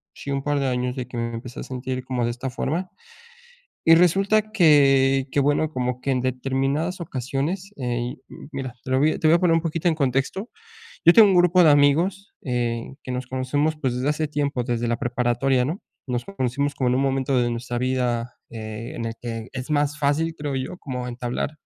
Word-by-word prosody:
sí, 140 - -6
un 140 0 -1
par 145 0 0
de 140 - 0
años 125 0 -1
de 125 -2 -4
que 125 - -7
me 115 0 -2
empecé 120 +1 -8
a - - -4
sentir 130 0 -4
como 125 -2 -1
de 120 - 0
esta 125 +2 -5
forma, 165 +9 -2 1.0
y 165 - +8
resulta 195 +5 +3
que 135 -7 +5
que 145 - +1
bueno, 145 +2 +2
como 125 -1 -2
que 135 - -2
en 130 - +1
determinadas 135 +7 -1
ocasiones, 150 - -3
eh 125 0 -3 0.4
mira, 130 -3 -5
te - - -6
lo 130 - +3
voy 155 +3 +3
a - - -4
te 155 - +1
voy 165 - +6
a - - 0
poner 175 -2 +4
un 165 - +3
poquito 165 +1 0
en 165 - +2
contexto. 140 - -1 0.6
Yo 170 - +9
tengo 220 0 +8
un 190 - +3
grupo 180 0 +5
de 160 - +7
amigos, 165 +8 +2
eh, 120 0 -2
que 130 - -5
nos 125 0 -4
conocemos, 145 +4 0
pues 130 -5 0
desde 130 +4 0
hace 150 0 0
tiempo, 140 -4 -1
desde 120 0 -1
la 120 0 0
preparatoria, 125 +2 +1
¿no?, 165 +9 -3 0.3
nos 125 -1 -2
conocimos 140 -6 -1
como 130 -2 +1
en 125 - +2
un 135 - +1
momento 135 -1 +1
de 120 - +1
nuestra 120 +1 -4
vida, 125 -2 -1 0.2
eh, 110 0 -7
en 115 - -4
el 115 - -3
que 115 -1 -5
es 125 +1 -6
más 145 -1 +1
fácil, 155 +3 +1
creo 145 -3 -4
yo 130 +7 -4
como 125 -5 -5
entablar 125 +3 -3
135 Hz, 215 wpm, -23 LUFS, 125-155 Hz, 1.0 s, Yo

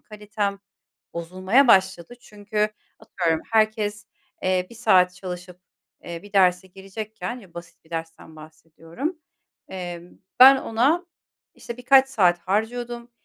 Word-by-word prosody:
kalitem 210 -2 -4 0.6
bozulmaya 185 +10 +1
başladı. 190 +1 +3
Çünkü 210 -2 -3 0.3
atıyorum 165 -3 -1
herkes, 215 -1 +1 0.4
eee, 185 -1 0
1 - - -12
saat 185 -6 +3
çalışıp, 180 -1 -8 0.4
eee, 170 0 -7
bir 205 - -15
derse 185 -2 +3
girecekken, 210 +5 -7
ya, 190 -6 -18
basit 170 -1 -12
bir - - -25
dersten 165 -1 -7
bahsediyorum, 165 - -8 0.5
eee, 175 -2 -6 0.4
ben, 270 +1 +10
ona, 275 +10 0 0.5
işte, 235 - -9
birkaç 265 +2 +5
saat 180 -9 +3
harcıyordum, 235 +5 -3
195 Hz, 120 wpm, -23 LUFS, 180-230 Hz, 0.6 s, ben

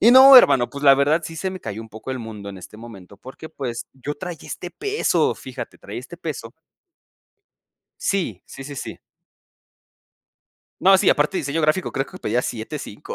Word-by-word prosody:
Y 230 - +7
no, 265 +1 +10
hermano, 130 - +6
pues, 140 0 -8
la 140 -1 +8
verdad 145 +4 +2
sí, 165 - -7
se 190 +4 -2
me 185 0 -8
cayó 110 -4 -6
un 115 - -13
poco 110 +4 -8
el 130 - -3
mundo 105 -3 -8
en 95 - -10
este 95 - -12
momento 100 -5 -12
porque, 130 +7 -11
pues, 125 -6 -5
yo 135 +3 -6
traía 175 +1 -7
este 175 - -6
peso, 415 - 0
fíjate, - - -9
traía - - -7
este - - -11
peso - - -6 1.5
Sí, 165 - -1
sí, 135 - -10
sí, 145 +1 -8
sí. - - -6 1.8
No, 195 +1 +7
sí, - - +4
aparte 150 +6 +1
de - - -1
diseño 145 +3 -2
gráfico, 155 +4 +1
creo 135 +1 -2
que 185 - -11
pedía 125 - -1
7.5, 110 -3 -6
140 Hz, 185 wpm, -22 LUFS, 115-180 Hz, 1.8 s, no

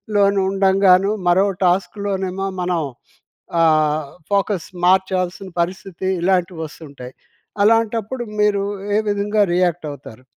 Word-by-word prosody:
లోను 200 -1 +3
ఉండంగాను 195 0 +4 0.2
మరో 185 +3 +4 0.2
టాస్క్‌లోనేమో 195 +1 -1
మనం 175 -2 0 0.8
ఆహ్, 155 -2 +2 0.3
ఫోకస్ 200 -2 0 0.2
మార్చాల్సిన 185 0 +1
పరిస్థితి 185 +1 -5
ఇలాంటివి 180 -2 0
వస్తుంటాయి. 140 -5 -11 0.5
అలాంటప్పుడు 225 +2 +1 0.2
మీరు 200 -1 +2 0.3
ఏ - - +4
విధంగా 205 +1 +1
రియాక్ట్ 175 -2 0
అవుతారు? 130 -3 -12
190 Hz, 100 wpm, -20 LUFS, 175-200 Hz, 0.8 s, ఉండంగాను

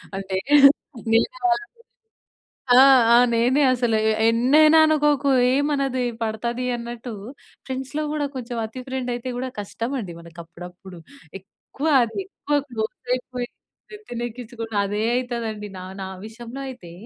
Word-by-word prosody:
అంటే, 195 -1 -4
వేరే 285 -1 +8 0.4
వేరేవాళ్ళు 365 - +1 1.2
ఆ! - - +9 0.3
ఆ! - - +8 0.2
నేనే 250 +5 +3
అసలు 240 -3 +1 0.3
ఎన్నైనా 300 +7 +5
అనుకోకు 295 -2 +2 0.2
ఏమి 285 +2 +1
అనదు 270 -2 -1 0.2
పడతది 235 +3 -2
అన్నట్టు. 235 0 -7 0.5
ఫ్రెండ్స్‌లో 265 +3 -4
కూడా 295 -1 -1
కొంచెం 240 -1 -5
అతి 240 +4 -9
ఫ్రెండ్ 260 -1 -3
అయితే 245 +1 -5
కూడా 260 +1 -3
కష్టం 230 +4 -5
అండి 185 -6 -7
మనకు 170 +1 -15
అప్పుడప్పుడు. 180 +2 -12 0.4
ఎక్కువ 270 +9 -8 0.2
అది 230 - -7
ఎక్కువ 295 -6 -2
క్లోజ్ 225 +2 -5
అయిపోయి 250 -1 -5 0.4
నెత్తిన 415 - -7
ఎక్కించుకున్నా 230 -2 -6
అదే 205 +2 -2
అయితదండి. 235 -4 -3
నా 185 - -8 0.2
నా 190 - -5 0.2
విషయంలో 235 +4 -9
అయితే, 185 -10 -10
245 Hz, 130 wpm, -23 LUFS, 220-275 Hz, 1.2 s, ఆ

